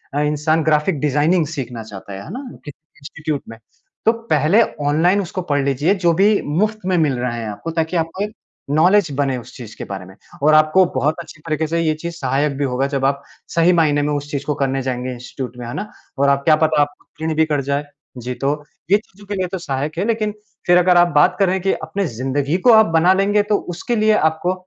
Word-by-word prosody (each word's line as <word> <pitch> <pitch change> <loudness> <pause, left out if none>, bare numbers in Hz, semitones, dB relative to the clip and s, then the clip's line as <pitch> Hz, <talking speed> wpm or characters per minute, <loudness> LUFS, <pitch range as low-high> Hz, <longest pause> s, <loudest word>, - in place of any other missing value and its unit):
अ, - - +1
इंसान 150 +2 +1
graphic 150 0 +1
designing 150 +4 +2
सीखना 125 -7 -5
चाहता 100 -2 -10
है, 95 - -7
है - - -11
ना? 265 +3 -6 0.2
कि 145 - -6 0.3
इंस्टीट्यूट 150 +1 -4
में, 115 - -9 0.5
तो 225 - +6 0.2
पहले 155 +10 +4 0.3
ऑनलाइन 175 +7 +3
उसको 185 0 -4
पढ़ 145 -1 +2
लीजिए 145 +8 +1
जो 170 - +5
भी 200 +4 +3 0.2
मुफ्त 215 0 0
में 185 -1 +1
मिल 145 -5 +1
रहा 125 -1 -2
है 115 - -5
आपको 105 +11 -6
ताकि 165 +1 -1
आपको 165 +5 -2
एक 210 - -5 0.4
नॉलेज 180 +6 +4
बने 135 -2 +1
उस 120 - -10
चीज़ 115 -3 -10
के - - -6
बारे 95 -2 -7
में। 95 +1 -14 0.3
और 155 +1 +5
आपको 155 +4 +5
बहुत 150 +3 +1
अच्छी 160 -2 -11
तरीके 155 0 0
से 165 +2 -1
ये 160 -1 +1
चीज़ 170 0 -4
सहायक 140 0 0
भी 145 - -1
होगा 130 +1 0
जब 140 -1 -2
आप 140 +1 +1 0.3
सही 170 +2 +4
मायने 150 -3 +3
में 150 - 0
उस 145 0 -4
चीज़ 140 -1 -3
को 150 - 0
करने 135 -1 -1
जाएँगे 125 0 -3
इंस्टीट्यूट 125 0 -7
में, 120 -1 -7
है 120 - -6
ना? 210 - -5 0.3
और 140 +1 +3
आप 140 0 +2
क्या 155 - +6
पता 155 -1 +2
आप 145 0 0 0.2
क्लीन 160 0 -2
भी 160 - +3
कर 150 -2 0
जाएँ। 140 +1 -1 0.4
जी 125 - -3
तो 140 +1 +2 0.4
ये 205 - +7
चीज़ों 205 -1 -16
के 205 - -3
लिए 185 -1 -1
तो 190 - -2
सहायक 150 +1 -3
है 195 - 0
लेकिन 220 -2 0 0.4
फ़िर 175 0 +6
अगर 180 0 +4
आप 175 - +6
बात 145 - +5
करें 190 -1 +2
कि 195 - +1
अपने 200 0 -3
ज़िंदगी 135 +5 -1
को - - +9
आप 220 0 +7
बना 175 +3 +5
लेंगे 205 +2 +2
तो 205 0 +1
उसके 175 +7 -3
लिए 215 -1 +3 0.2
आपको 165 +3 -2
155 Hz, 235 wpm, -19 LUFS, 140-180 Hz, 0.5 s, को